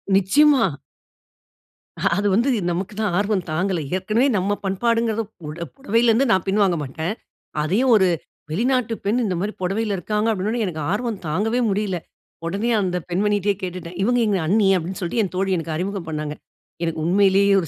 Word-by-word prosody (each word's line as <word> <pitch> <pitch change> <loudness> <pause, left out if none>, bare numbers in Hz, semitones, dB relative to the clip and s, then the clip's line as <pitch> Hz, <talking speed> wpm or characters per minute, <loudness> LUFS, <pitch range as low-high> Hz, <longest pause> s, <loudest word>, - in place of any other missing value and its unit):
நிச்சயமா. 275 +9 +5 1.3
அ - - -8 0.2
அது 205 0 +1
வந்து 235 +7 +3 0.2
நமக்கு 185 +4 -3
தான் 205 -5 0
ஆர்வம் 205 -2 0
தாங்கல. 180 +3 0 0.2
ஏற்கனவே 215 +8 +1
நம் 195 +1 0
பண்பாடுங்றத 230 +3 +1 0.2
புட 160 +1 -6
புடவைலருந்து 235 -1 +2
நான் 190 -4 +2
பின்வாங்க 195 -2 +3
மாட்டேன். 160 +7 -3 0.5
அதையும் 205 +12 +2
ஒரு 190 -3 +5 0.4
வெளிநாட்டு 235 +5 +1
பெண், 225 +5 +2
இந்த 190 -3 -1
மாரி 205 +4 -2
புடவைல 200 +3 0
இருக்காங்க, 210 +4 -1
அப்டின 195 -2 -2
உடனே, 235 +1 -1
எனக்கு 160 -5 -4
ஆர்வம் 220 0 -2
தாங்கவே 210 +10 0
முடியல. 200 -2 0 0.5
உடனே 200 +7 -1
அந்த 180 -2 -1
பெண்மணிட்டயே 205 +2 +1
கேட்டுட்டேன். 180 -1 -6
"இவங்க 245 +5 +2
எங்க 200 -3 +1
அண்ணி." 205 +3 +3
அப்டின்னு 180 +2 -5
சொல்ட்டு 180 +6 -1
என் 190 - -4
தோழி 190 +1 0
எனக்கு 165 -1 -4
அறிமுகம் 185 +1 -3
பண்ணாங்க. 150 -1 -3 0.5
எனக்கு 165 -1 -2
உண்மைலயே 195 +2 +4
ஒரு 165 - -5
195 Hz, 160 wpm, -22 LUFS, 180-220 Hz, 1.3 s, நிச்சயமா